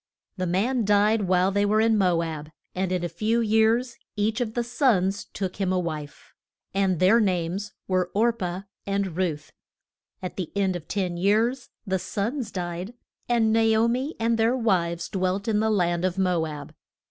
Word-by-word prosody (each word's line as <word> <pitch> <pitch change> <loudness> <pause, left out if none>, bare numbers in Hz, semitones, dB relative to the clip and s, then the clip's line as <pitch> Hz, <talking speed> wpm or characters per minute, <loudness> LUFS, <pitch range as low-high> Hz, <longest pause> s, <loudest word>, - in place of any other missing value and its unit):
The 185 -2 -2
man 225 +8 +1
died 205 0 +3
while 185 +1 +3
they 205 +1 +1
were 210 +1 +2
in 225 0 +4
Mo 180 -5 +2
ab, 155 -2 -5 0.2
and 185 0 -2
in 180 -1 -1
a - - 0
few 215 +7 0
years 225 +2 +2 0.2
each 215 +3 0
of 225 -2 -3
the 240 - +1
sons 230 -6 +1
took 190 -2 -5
him 190 -2 0
a 185 - +1
wife. 155 -5 -5 0.4
And 190 -3 +1
their 195 +6 +5
names 190 0 -1
were 185 -1 +1
Or 230 +3 +3
pah 185 -3 -4 0.2
and 195 -3 -1
Ruth. 165 -5 -2 0.7
At 185 - -6
the 180 -5 -4
end 195 -2 +1
of 170 -3 -7
ten 185 -4 -2
years 225 +8 +1 0.2
the 190 -2 0
sons 220 +8 -3
died, 180 +4 -5 0.3
and 225 -2 +3
Na 225 - +4 0.2
o 230 - +4
mi 260 +6 -1
and 230 0 +1
their 230 +3 +3
wives 170 -7 0
dwelt 190 +1 -1
in 215 -2 +2
the 220 +1 +1
land 175 -4 +1
of 185 0 0
Mo 180 -4 +1
ab. 150 -2 -8
195 Hz, 185 wpm, -25 LUFS, 180-225 Hz, 0.7 s, their